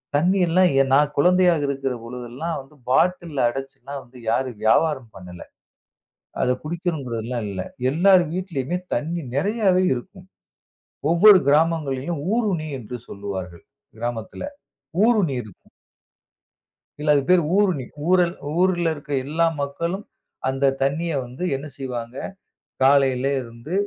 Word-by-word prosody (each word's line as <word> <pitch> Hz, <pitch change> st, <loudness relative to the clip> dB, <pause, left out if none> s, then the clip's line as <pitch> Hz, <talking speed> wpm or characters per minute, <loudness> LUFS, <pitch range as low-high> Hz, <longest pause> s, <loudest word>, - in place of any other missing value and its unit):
தண்ணீர்லாம் 180 Hz, +2 st, +3 dB
எ -, -, +5 dB
நான் 145 Hz, +1 st, +4 dB
குழந்தையாக 175 Hz, -1 st, +4 dB
இருக்கற 135 Hz, -1 st, -2 dB
பொழுது 125 Hz, +1 st, -7 dB
எல்லாம் 160 Hz, +7 st, -3 dB
வந்து 135 Hz, +3 st, -19 dB
பாட்டில்‌ல 160 Hz, -1 st, +2 dB
அடைச்சு 135 Hz, +2 st, -6 dB
எல்லாம் 140 Hz, +3 st, -7 dB
வந்து 125 Hz, +1 st, -17 dB
யாரும் 120 Hz, 0 st, -1 dB
வியாபாரம் 130 Hz, +1 st, +2 dB
பண்ணல. 90 Hz, -2 st, -10 dB, 1.0 s
அத -, -, +2 dB
குடிக்கணுங்கறதுலாம் 130 Hz, -, -3 dB
இல்ல. 95 Hz, -2 st, -4 dB, 0.3 s
எல்லார் 180 Hz, +4 st, +5 dB
வீட்டிலேயுமே 175 Hz, -3 st, -2 dB, 0.2 s
தண்ணீர் 155 Hz, -4 st, -3 dB
நிறையாவே 190 Hz, +2 st, +2 dB
இருக்கும். 185 Hz, +9 st, -9 dB, 0.9 s
ஒவ்வொரு 190 Hz, +3 st, +8 dB
கிராமங்களிலும் 150 Hz, -1 st, +1 dB
ஊருணி 200 Hz, -9 st, 0 dB
என்று 125 Hz, +1 st, -7 dB
சொல்லுவார்கள், 95 Hz, -4 st, -6 dB, 0.4 s
கிராமத்துல. 115 Hz, -2 st, -4 dB, 0.6 s
ஊருணி 205 Hz, -, +2 dB
இருக்கும். 105 Hz, -5 st, -16 dB, 1.3 s
இல்ல, 150 Hz, 0 st, -2 dB
அதுக்கு 140 Hz, +2 st, +1 dB
பேரு 180 Hz, -2 st, +5 dB
ஊருணி. 185 Hz, -11 st, +2 dB, 0.2 s
ஊரல் 180 Hz, -1 st, +3 dB, 0.2 s
ஊர்ல 175 Hz, -3 st, +2 dB
இருக்கிற 145 Hz, -1 st, -4 dB
எல்லா 165 Hz, +4 st, +1 dB, 0.2 s
மக்களும் 170 Hz, +8 st, -3 dB, 0.4 s
அந்த 135 Hz, +1 st, 0 dB, 0.2 s
தண்ணீய 155 Hz, +5 st, 0 dB
வந்து 125 Hz, +8 st, -8 dB
என்ன 140 Hz, +3 st, -6 dB
செய்வாங்க? 125 Hz, -3 st, -5 dB, 0.7 s
காலையில 135 Hz, -1 st, +4 dB, 0.2 s
இருந்து 115 Hz, +7 st, -9 dB
145 Hz, 120 wpm, -23 LUFS, 125-175 Hz, 1.3 s, ஒவ்வொரு